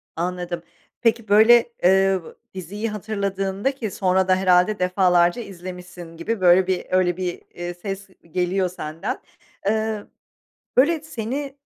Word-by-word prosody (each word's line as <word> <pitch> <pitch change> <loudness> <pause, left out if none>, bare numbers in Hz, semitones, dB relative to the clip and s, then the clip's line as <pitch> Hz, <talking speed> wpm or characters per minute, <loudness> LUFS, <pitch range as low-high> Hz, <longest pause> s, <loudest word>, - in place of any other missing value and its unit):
Anladım, 175 0 -3 0.4
peki, 230 -2 +1
böyle, 225 +3 +6
eee, 190 +1 +4 0.3
diziyi 205 +5 -4
hatırladığında 200 +1 -2
ki 225 -6 -4
sonra 190 0 +1
da 185 - +5
herhâlde 185 +2 +3
defalarca 180 +1 +3
izlemişsin 180 -3 -9
gibi 205 +5 -3
böyle 185 +1 +5
bir 185 -1 -1
öyle 185 -1 +2
bir, 180 -2 -3
eee, 175 0 -5
ses 195 +2 -6 0.2
geliyor 180 +1 0
senden. 160 -2 -5 0.5
Eee, 220 0 0 0.7
böyle, 310 +5 +4
seni, 275 0 -5
190 Hz, 125 wpm, -23 LUFS, 180-215 Hz, 0.7 s, böyle